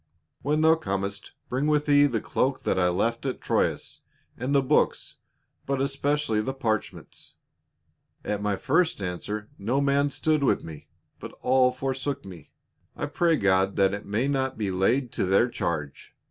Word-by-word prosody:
"When 150 Hz, +2 st, +1 dB
thou 160 Hz, 0 st, +6 dB
Comest, 100 Hz, -5 st, -4 dB
bring 135 Hz, +4 st, -1 dB
with 150 Hz, -1 st, +2 dB
thee 145 Hz, 0 st, +5 dB
the 120 Hz, -5 st, -1 dB
cloak 130 Hz, 0 st, -1 dB
that -, -, +1 dB
I 90 Hz, -1 st, +3 dB
left 115 Hz, +6 st, 0 dB
at 130 Hz, -, -3 dB
Troas, -, -, -1 dB, 0.3 s
and 130 Hz, +4 st, -1 dB
the 140 Hz, -, +4 dB
books, 145 Hz, +3 st, +1 dB, 0.5 s
but 135 Hz, -1 st, 0 dB
especially 140 Hz, -4 st, 0 dB
the 135 Hz, +5 st, -3 dB
parch 110 Hz, -6 st, -1 dB
ments. -, -, -10 dB, 0.9 s
"At 105 Hz, -1 st, -2 dB
my 105 Hz, -1 st, 0 dB
first 160 Hz, -, +1 dB
answer 105 Hz, +4 st, -4 dB
no 120 Hz, +7 st, 0 dB
man 140 Hz, 0 st, +2 dB
stood 155 Hz, +1 st, 0 dB
with -, -, +2 dB
me, 80 Hz, -2 st, -10 dB, 0.3 s
but -, -, -8 dB
all 130 Hz, 0 st, +4 dB
forsook 135 Hz, +1 st, -3 dB
me. 90 Hz, -5 st, -11 dB, 0.5 s
I -, -, -3 dB
pray 165 Hz, +3 st, +2 dB
God 95 Hz, -4 st, +2 dB
that 100 Hz, -1 st, +3 dB
it 100 Hz, -, -6 dB
may 110 Hz, +6 st, 0 dB
not 135 Hz, -1 st, -1 dB
be 105 Hz, -3 st, -1 dB
laid 115 Hz, +7 st, +1 dB
to -, -, -1 dB
<iheir 110 Hz, +6 st, +3 dB
charge. 80 Hz, -10 st, -4 dB
125 Hz, 170 wpm, -26 LUFS, 100-140 Hz, 0.9 s, thou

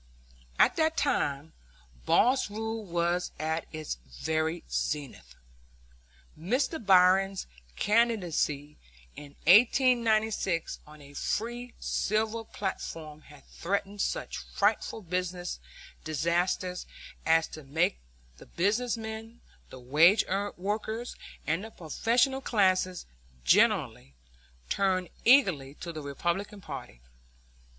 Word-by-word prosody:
At -, -, +4 dB
that 320 Hz, 0 st, +1 dB
time 150 Hz, -, 0 dB, 0.5 s
boss 255 Hz, -1 st, +3 dB
rule 220 Hz, +1 st, -4 dB
was 175 Hz, -1 st, -1 dB
at 160 Hz, +2 st, -2 dB
its 155 Hz, -, -5 dB
very 160 Hz, -, -2 dB
zenith. 125 Hz, -, -4 dB, 1.0 s
Mr. 245 Hz, -, -1 dB
Bryan's 190 Hz, 0 st, +4 dB, 0.3 s
candidacy 180 Hz, -10 st, +1 dB, 0.4 s
in 145 Hz, -1 st, -11 dB
1896 220 Hz, -, +3 dB
on 150 Hz, -1 st, -14 dB
a 140 Hz, 0 st, -14 dB
free 240 Hz, +10 st, -3 dB
silver 220 Hz, +2 st, -1 dB
platform 165 Hz, -7 st, -5 dB
had 150 Hz, -2 st, -17 dB
threatened 200 Hz, +2 st, -3 dB
such -, -, -2 dB
frightful 220 Hz, -, -1 dB
business 180 Hz, 0 st, -3 dB, 0.4 s
disaster 170 Hz, +4 st, 0 dB, 0.5 s
as 160 Hz, 0 st, +3 dB
to 155 Hz, -, -9 dB
make 145 Hz, -, 0 dB, 0.4 s
the -, -, -14 dB
business 220 Hz, +7 st, 0 dB
men, 225 Hz, +1 st, -7 dB, 0.3 s
the 130 Hz, -, -10 dB
wage 155 Hz, -, +5 dB, 0.3 s
workers, 220 Hz, +5 st, -3 dB, 0.3 s
and 165 Hz, +5 st, 0 dB
the 220 Hz, -, -7 dB
professional 235 Hz, -, 0 dB
classes 185 Hz, -6 st, +1 dB, 0.4 s
generally, 65 Hz, +2 st, +2 dB, 0.5 s
turn 185 Hz, -2 st, 0 dB, 0.2 s
eagerly 180 Hz, -, +4 dB
to 170 Hz, +1 st, -7 dB
the 155 Hz, -, -6 dB
Republican 175 Hz, +8 st, -3 dB
party. -, -, -9 dB
185 Hz, 100 wpm, -29 LUFS, 155-220 Hz, 1.0 s, wage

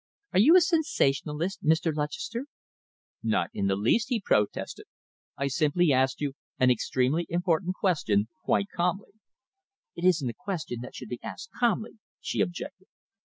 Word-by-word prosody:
Are -, -, +4 dB
you 295 Hz, -, +7 dB
a 370 Hz, -, +8 dB
sensationalist, 190 Hz, -, 0 dB
Mr. 160 Hz, +1 st, +2 dB
Lutchester?" 210 Hz, -, -3 dB, 0.8 s
"Not 110 Hz, -1 st, 0 dB
in 100 Hz, -, -1 dB
the 95 Hz, -, +2 dB
least," 120 Hz, -, +2 dB
he 245 Hz, -3 st, +1 dB
protested. 105 Hz, -, -1 dB, 0.5 s
"I 140 Hz, -, -1 dB
simply 150 Hz, +3 st, +2 dB
asked 130 Hz, +2 st, +1 dB
you 145 Hz, -2 st, -1 dB, 0.2 s
an 130 Hz, 0 st, +4 dB
extremely 130 Hz, +7 st, 0 dB
important 175 Hz, +1 st, 0 dB
question 110 Hz, -, +1 dB, 0.2 s
quite 200 Hz, -, +2 dB
calmly." 180 Hz, +3 st, -1 dB, 0.8 s
"It 170 Hz, -, -7 dB
isn't 170 Hz, -7 st, +3 dB
a 115 Hz, -, -21 dB
question 160 Hz, -, -3 dB
that 125 Hz, -, -9 dB
should -, -, -8 dB
be 125 Hz, -, -5 dB
asked 195 Hz, -, -7 dB
calmly," 230 Hz, -1 st, 0 dB, 0.2 s
she -, -, -2 dB
objected. 185 Hz, +1 st, -4 dB
165 Hz, 150 wpm, -28 LUFS, 130-195 Hz, 0.8 s, a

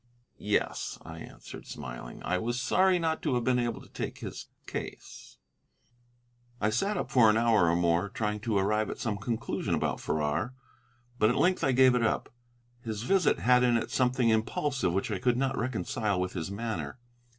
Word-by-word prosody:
"Yes," 105 Hz, 0 st, -1 dB
I 80 Hz, 0 st, -8 dB
answered, -, -, -11 dB
smiling, 60 Hz, -4 st, -8 dB
"I 90 Hz, -, 0 dB
was 120 Hz, +4 st, -2 dB
sorry 185 Hz, +9 st, +3 dB
not 160 Hz, -2 st, -1 dB
to 130 Hz, -, 0 dB
have 120 Hz, -, 0 dB
been 125 Hz, 0 st, +2 dB
able 120 Hz, -2 st, -1 dB
to -, -, -16 dB
take -, -, -5 dB
his -, -, -7 dB, 0.2 s
case." -, -, -8 dB, 1.2 s
I 105 Hz, 0 st, +1 dB
sat 195 Hz, -, 0 dB
up -, -, -3 dB
for 115 Hz, -4 st, +6 dB
an 105 Hz, -, +4 dB
hour 110 Hz, -7 st, +4 dB
or 85 Hz, -, +2 dB
more, 85 Hz, +3 st, +2 dB
trying 105 Hz, 0 st, -2 dB
to 110 Hz, -1 st, -1 dB
arrive 105 Hz, +2 st, +1 dB
at -, -, -5 dB
some 105 Hz, -3 st, -2 dB
conclusion 115 Hz, +2 st, -2 dB
about -, -, -1 dB
Farrar, 75 Hz, +11 st, -1 dB, 0.6 s
but 110 Hz, -, +5 dB
at 120 Hz, -, +1 dB
length 180 Hz, -1 st, +2 dB
I 135 Hz, -, +3 dB
gave 130 Hz, 0 st, +6 dB
it 125 Hz, -, +2 dB
up. 115 Hz, -, 0 dB, 0.5 s
His 110 Hz, -2 st, -4 dB
visit 185 Hz, +6 st, +2 dB
had 125 Hz, +1 st, +5 dB
in 120 Hz, -1 st, +4 dB
it 115 Hz, -, -3 dB
something 125 Hz, -2 st, +2 dB
impulsive 110 Hz, 0 st, 0 dB
which 95 Hz, +4 st, -1 dB
I 100 Hz, -, -1 dB
could 125 Hz, +2 st, +2 dB
not 135 Hz, +1 st, 0 dB
reconcile 110 Hz, -4 st, -1 dB
with 90 Hz, 0 st, -2 dB
his 85 Hz, -1 st, -4 dB
manner. 110 Hz, +4 st, -4 dB
115 Hz, 185 wpm, -29 LUFS, 100-125 Hz, 1.2 s, for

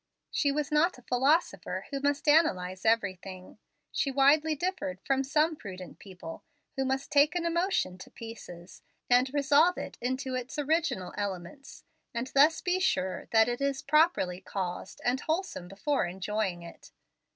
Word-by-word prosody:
She 285 Hz, -, +1 dB
was 295 Hz, 0 st, -2 dB
not 305 Hz, +3 st, +3 dB
a 250 Hz, -, -16 dB
philosopher 270 Hz, +8 st, +1 dB
who 275 Hz, -, -2 dB
must 285 Hz, +1 st, 0 dB
analyze 190 Hz, -, +3 dB
everything. 190 Hz, -4 st, -1 dB, 0.3 s
She 275 Hz, -, 0 dB
widely 290 Hz, +4 st, +4 dB
differed 310 Hz, -, -3 dB
from 270 Hz, -1 st, +1 dB
some 305 Hz, +4 st, +2 dB
prudent 185 Hz, -, -9 dB
people 180 Hz, -4 st, -10 dB, 0.3 s
who 270 Hz, -, -1 dB
must 265 Hz, +1 st, -2 dB
take 290 Hz, +3 st, +4 dB
an 345 Hz, -1 st, -1 dB
emotion 335 Hz, -, 0 dB
to -, -, -11 dB
pieces, 190 Hz, -6 st, -10 dB, 0.3 s
and 250 Hz, +2 st, +4 dB
resolve 295 Hz, +5 st, +4 dB
it -, -, -7 dB
into 260 Hz, +2 st, -2 dB
its 255 Hz, +2 st, -4 dB
original 295 Hz, -, 0 dB
elements, 200 Hz, -, -6 dB, 0.3 s
and 235 Hz, +1 st, -1 dB
thus 295 Hz, +4 st, +5 dB
be 365 Hz, +1 st, 0 dB
sure 190 Hz, -, 0 dB
that 220 Hz, -1 st, +5 dB
it 245 Hz, +2 st, -2 dB
is 275 Hz, -1 st, -1 dB
properly 275 Hz, -, +2 dB
caused 185 Hz, -1 st, -5 dB
and 250 Hz, +2 st, +1 dB
wholesome 320 Hz, -, -2 dB
before 195 Hz, +4 st, -1 dB
enjoying 190 Hz, -1 st, -3 dB
it. 170 Hz, -, -12 dB
265 Hz, 150 wpm, -29 LUFS, 190-300 Hz, 0.3 s, thus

